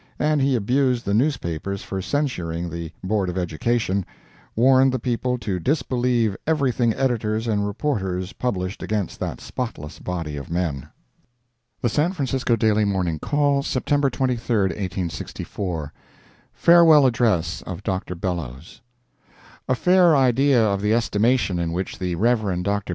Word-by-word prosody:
And 150 -1 +1
he 135 -1 +2
abused 125 +2 +1
the 100 - 0
newspapers 100 - -1
for 95 -1 -4
censuring 90 - -2
the 85 -1 -6
Board 95 -1 0
of 90 - -4
Education—warned 115 +7 0
the 130 - 0
people 125 +1 -1
to 105 -6 -3
disbelieve 125 - 0
everything 130 -6 +2
editors 115 -4 0
and 105 -2 0
reporters 95 -6 -2
published 95 -6 -3
against 105 -4 -3
that - - -4
spotless 115 - -6
body 85 -5 -4
of 70 - -7
men. 85 -6 -2 0.9
The 120 - +3
San 155 - +1
Francisco 135 -6 0
Daily 110 -1 +2
Morning 90 -6 -1
Call, 145 - +1
September 140 +1 0
23, 120 -2 -1
1864 90 -2 -4 0.6
FAREWELL 165 -4 +6
ADDRESS 90 -10 +1
OF 95 +1 -7
DR. 95 -3 -3
BELLOWS 85 - -5 0.9
A 130 - +3
fair 180 +2 +4
idea 130 -1 +4
of 100 -2 0
the 105 +2 +2
estimation 115 -4 +1
in 85 -1 -1
which 90 +2 -4
the 90 -2 -2
Rev. 105 -4 +1
Dr. 100 +1 -2
110 Hz, 135 wpm, -23 LUFS, 90-130 Hz, 0.9 s, FAREWELL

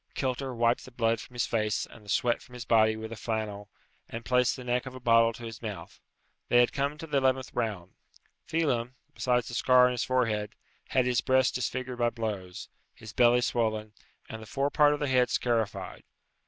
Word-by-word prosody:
Kilter 130 0 -2
wiped 115 +1 +2
the - - -11
blood 115 -2 0
from 125 - -12
his 120 - +1
face 110 -2 -1
and 110 - -16
the 100 - -14
sweat 120 +4 +1
from 125 - -17
his 125 -1 -7
body 110 -1 +4
with 110 0 -7
a - - -5
flannel, 105 -2 -4 0.4
and 115 0 -7
placed 125 -1 +2
the 130 - -9
neck 125 +1 -1
of 130 - -8
a - - -8
bottle 115 -1 +4
to 120 - -11
his 115 -2 -8
mouth. 100 -7 -7 0.5
They 120 - +5
had 120 - +3
come 140 +1 -1
to 160 - -7
the 150 -3 -1
eleventh 130 -1 0
round. 105 -7 -3 0.5
Phelem, 130 -7 0 0.2
besides 125 -3 0
the - - -7
scar 125 +1 +5
on 125 - +2
his 120 -2 -1
forehead, 115 -5 0 0.3
had 130 -1 +2
his 125 -2 +1
breast 130 0 +2
disfigured 130 0 -3
by 120 0 +3
blows, 105 -6 -5 0.3
his 110 -1 -11
belly 120 +1 +4
swollen, 110 -3 -1 0.3
and 110 - -8
the 110 - -11
fore 140 +4 -1
part 150 -1 +4
of - - -8
the 145 - -1
head 125 -2 +3
scarified. 105 -6 -1
120 Hz, 210 wpm, -28 LUFS, 110-125 Hz, 0.5 s, They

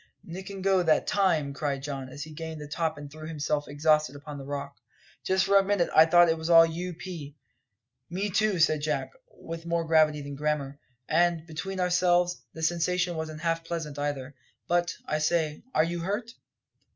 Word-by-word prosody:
"Nick 190 +3 -8
and 195 -1 -7
go 190 -1 +3
that 160 -3 +3
time!" 165 -8 +1
cried 140 -1 -2
Don, 135 -2 -5
as 145 +3 -7
he 155 - -10
gained 160 0 -6
the 150 - -7
top 160 +1 -2
and 145 -1 -9
threw 155 +1 -9
himself 150 -2 -2
exhausted 150 -1 +2
upon 145 0 -8
the - - -7
rock. 140 0 -5 0.5
"Just 190 0 +2
for 200 0 +5
a 195 - +5
minute 195 -3 +1
I 160 +1 +8
thought 175 +1 +6
it 165 0 +1
was 160 +1 -4
all 165 -1 +9
U.P." 170 -3 -6 0.7
"Me 195 +4 -2
too," 210 0 +2
said 155 -2 +3
Jack, 150 +1 -1 0.2
with 165 - -9
more 170 0 0
gravity 155 -2 +3
than 140 0 -7
grammar; 145 -1 -2 0.3
"and, 170 0 +2
between 185 +4 -5
ourselves, 180 0 +2
the 160 - -6
sensation 175 +1 +1
wasn't 155 -1 -5
half 165 -1 0
pleasant, 165 -4 -5
either. 145 -1 -3 0.3
But, 175 0 +1
I 155 - -1
say, 155 -1 0
are 155 - +5
you 170 +1 -2
hurt?" 205 +7 -3
160 Hz, 190 wpm, -28 LUFS, 150-175 Hz, 0.7 s, all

